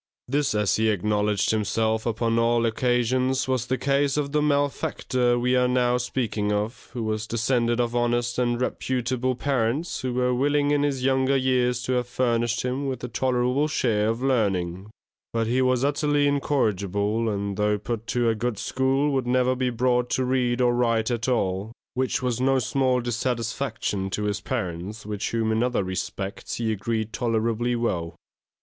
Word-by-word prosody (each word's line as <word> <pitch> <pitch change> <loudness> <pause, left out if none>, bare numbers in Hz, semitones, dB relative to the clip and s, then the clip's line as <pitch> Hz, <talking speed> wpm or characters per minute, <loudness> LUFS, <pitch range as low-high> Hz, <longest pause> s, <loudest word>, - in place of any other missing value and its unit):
This, 140 -2 0
as 105 -2 +2
he 110 0 +2
acknowledged 105 0 +1
himself 110 +1 0
upon 115 0 +1
all 115 0 +2
occasions, 125 +2 +1
was 130 -2 0
the 130 +1 0
case 140 +1 +1
of 140 -1 -1
the 150 0 +2
malefactor 140 -4 +1
we 125 +1 +1
are 125 0 +3
now 125 -1 +2
speaking 120 -4 -1
of, 105 +4 -3
who 120 - -3
was 110 0 -2
descended 120 +1 +1
of 120 0 0
honest 120 0 0
and 120 -1 +1
reputable 130 0 -1
parents, 135 +4 -1
who 125 -1 -2
were 125 0 +2
willing 145 +3 +2
in 145 -1 +2
his 140 -3 -1
younger 135 +1 +2
years 125 -1 +1
to 130 - -2
have 125 -1 0
furnished 120 -1 0
him 130 +3 -2
with 130 -2 -4
a - - -2
tolerable 125 +4 +1
share 110 -8 +1
of 115 +3 -1
learning; 100 -7 0 0.4
but 115 -1 +1
he 125 +3 +1
was 130 0 +2
utterly 145 0 +2
incorrigible, 110 -6 0
and 100 -1 -2
though 105 0 +2
put 115 +2 -5
to 120 -1 +1
a 115 - +3
good 115 0 -2
school, 135 +6 +1
would 130 -2 0
never 125 +1 +2
be 130 0 0
brought 125 0 +1
to 130 - 0
read 125 -1 +1
or 120 -1 +3
write 115 -1 +1
at 115 -1 -2
all, 100 -3 0 0.2
which 130 0 -1
was 125 -1 -1
no 135 +1 +3
small 130 0 +1
dissatisfaction 115 -4 -2
to 105 +2 -3
his 105 0 -1
parents, 100 -3 -4
with 105 -1 -5
whom 115 -1 0
in 110 +1 +1
other 125 -4 +1
respects 95 +2 -4
he 115 -1 -1
agreed 110 +1 -2
tolerably 115 0 0
well. 90 -8 -2
120 Hz, 175 wpm, -25 LUFS, 110-130 Hz, 0.4 s, are